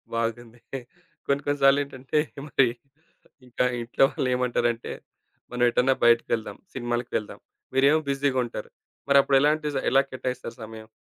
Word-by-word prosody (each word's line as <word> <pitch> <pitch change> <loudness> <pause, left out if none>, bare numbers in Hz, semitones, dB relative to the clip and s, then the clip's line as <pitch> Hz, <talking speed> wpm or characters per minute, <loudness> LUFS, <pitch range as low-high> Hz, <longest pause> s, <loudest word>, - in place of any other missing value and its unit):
బాగుంది. 115 +1 -3 0.7
కొన్ని 140 0 +1
కొన్ని 145 0 0
సార్లు 135 +1 +6
ఏంటంటే 135 +1 -2 0.3
మరి, 135 -3 +3 0.8
ఇంకా 125 +1 0 0.2
ఇంట్లో 120 +3 +3
వాళ్ళేమంటారంటే, 125 -2 0 0.6
మనం 125 0 -1
ఎటన్నా 125 +3 +3
బయటికెళ్దాం, 115 -1 +2 0.2
సినిమాలకి 120 -1 -3
వెళ్దాం, 105 - -7 0.3
మీరేమో 140 +4 +4
బిజీగుంటారు. 135 -3 -1 0.4
మరప్పుడు 140 -1 +5
ఎలాంటి 150 +1 +2
స - - +1
ఎలా 135 - +6
కేటాయిస్తారు 130 -2 -5
సమయం? 110 0 -10
125 Hz, 120 wpm, -25 LUFS, 120-140 Hz, 0.8 s, సార్లు